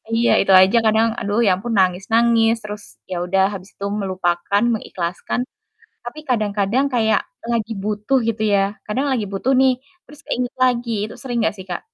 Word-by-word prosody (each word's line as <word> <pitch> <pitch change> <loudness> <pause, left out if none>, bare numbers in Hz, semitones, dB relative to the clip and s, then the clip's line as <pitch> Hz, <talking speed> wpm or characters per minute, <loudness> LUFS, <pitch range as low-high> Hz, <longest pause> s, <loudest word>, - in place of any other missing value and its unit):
Iya 235 +1 +3
itu 195 - +1
aja 195 +5 +4
kadang 220 +1 +3
aduh 205 +3 -1
ya - - +4
ampun 225 +5 -4
nangis-nangis 225 +5 +3
terus 210 -1 -7 0.3
ya - - -2
udah 190 +2 +2
habis 190 0 -8
itu 200 - -6 0.2
melupakan 185 +2 0
mengikhlaskan, 185 +2 -3 0.6
tapi 240 +5 -8
kadang-kadang 215 +2 +1
kayak 220 -2 +2 0.3
lagi 225 -1 -1
butuh 210 +6 0
gitu 220 -1 -2
ya 195 - +4 0.3
kadang 265 +7 -1
lagi 220 -5 -1
butuh 235 +7 0
nih, 265 -1 +5 0.3
terus 295 0 -15
keinget 245 0 -2
lagi 245 -2 0
itu 215 - -7
sering 245 -3 -3
gak - - -1
sih 190 - -9
Kak? - - -3
215 Hz, 170 wpm, -20 LUFS, 195-235 Hz, 0.6 s, nih